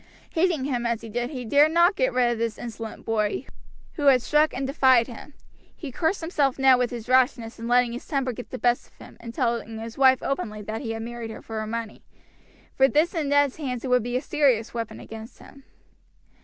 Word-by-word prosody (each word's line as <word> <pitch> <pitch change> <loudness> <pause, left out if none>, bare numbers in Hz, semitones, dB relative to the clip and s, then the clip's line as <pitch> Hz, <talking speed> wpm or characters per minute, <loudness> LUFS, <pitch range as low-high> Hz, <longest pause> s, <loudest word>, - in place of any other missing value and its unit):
Hating 325 -5 +1
him 250 -4 -1
as 235 -1 -1
he 230 - -9
did, 240 +3 -2
he 255 -4 -6
dared 290 +6 +4
not 345 +3 +4
get - - +1
rid 245 -1 +2
of 235 - -3
this 230 -2 -2
insolent 225 -2 -8
boy, 220 +2 -1 0.5
who 290 -2 0
had 255 -3 +6
struck 300 +2 +3
and 270 +2 -3
defied 260 -4 +4
him. 255 +4 -11 0.4
He 290 -5 -7
cursed 330 +8 -1
himself 295 -5 0
now 265 -1 +6
with 250 -1 0
his 240 -1 -7
rashness 250 -3 +2
in 230 - -5
letting 245 0 +3
his 245 - -8
temper 270 -4 -1
get 245 - -9
the 255 - -5
best 245 -1 +1
of - - -30
him - - -14
and 230 -1 -8
telling 230 -2 -2
his 225 +3 -8
wife 260 -1 +5
openly 215 -6 -3
that 215 +2 -5
he 225 -4 -3
had 225 0 -5
married 235 -1 -6
her 220 - -9
for 225 -1 -5
her 215 - -4
money; 230 -1 -5 0.7
for 270 - +4
this 305 +5 +2
in 315 -5 -1
Ned's 285 -2 +3
hands 255 -6 -4
would 250 -1 +3
be 245 +2 -2
a - - -2
serious 260 -7 +1
weapon 230 -2 -5
against 225 +1 -10
him. 275 -1 -16
250 Hz, 225 wpm, -25 LUFS, 230-275 Hz, 0.7 s, had